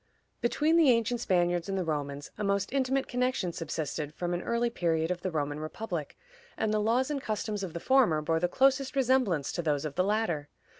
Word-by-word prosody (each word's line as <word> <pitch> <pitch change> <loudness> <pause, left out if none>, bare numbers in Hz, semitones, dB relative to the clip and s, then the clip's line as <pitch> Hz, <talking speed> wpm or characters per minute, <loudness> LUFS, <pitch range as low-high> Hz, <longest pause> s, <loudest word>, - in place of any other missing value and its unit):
Between 300 +7 +2
the 320 -5 +6
ancient 235 0 +2
Spaniards 175 -3 +1
and 195 - -1
the 185 - 0
Romans 145 -3 -3
a - - -4
most 200 +2 0
intimate 270 0 +1
connection 250 -8 -1
subsisted 155 -2 -4
from 175 0 -2
an 175 - -1
early 235 +2 0
period 165 -4 0
of 180 -1 -3
the 185 - -2
Roman 145 -3 -2
republic, 155 -1 -5 0.4
and 215 -1 0
the 215 - +2
laws 245 +6 +1
and 280 -2 -2
customs 215 -2 -3
of 185 -4 -5
the 170 - -4
former 245 -9 +4
bore 160 +2 0
the 175 - +2
closest 270 +6 +2
resemblance 250 - +2
to 175 - -2
those 150 -3 0
of 150 - -4
the 180 - +1
latter. 185 -8 0
190 Hz, 205 wpm, -29 LUFS, 160-245 Hz, 0.4 s, the